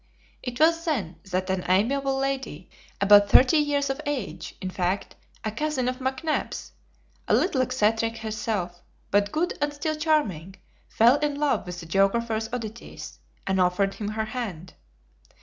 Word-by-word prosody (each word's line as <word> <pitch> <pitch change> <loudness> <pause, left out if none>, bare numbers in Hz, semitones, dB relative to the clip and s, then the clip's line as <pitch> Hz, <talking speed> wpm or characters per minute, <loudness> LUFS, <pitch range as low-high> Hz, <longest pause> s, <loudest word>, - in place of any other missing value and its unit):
It 245 -1 -5
was 330 +1 +4
then 225 - -2
that 185 +1 -1
an 185 -1 -1
amiable 270 +9 +2
lady, 270 - -3 0.3
about 205 0 +6
thirty 260 +8 +6
years 290 -1 +1
of 270 - -5
age, 200 - -4
in 185 - -4
fact, 185 +2 -2 0.3
a 215 - -2
cousin 270 +1 -1
of 255 +1 -2
McNabbs, 265 +4 -2 0.6
a - - +4
little 290 -8 +2
eccentric 225 -1 +1
herself, 215 -5 -3 0.3
but 205 0 +2
good 345 +3 0
and 290 0 +1
still 290 +2 -2
charming, 255 - 0 0.3
fell 240 +5 +5
in 295 -1 0
love 295 -9 +1
with 180 0 -6
the - - -9
geographer's 220 +5 +1
oddities, 230 -2 -7 0.3
and 190 -1 +1
offered 185 +2 +2
him 210 - -5
her 220 +1 -2
hand. 205 -7 -5
225 Hz, 150 wpm, -26 LUFS, 195-275 Hz, 0.6 s, about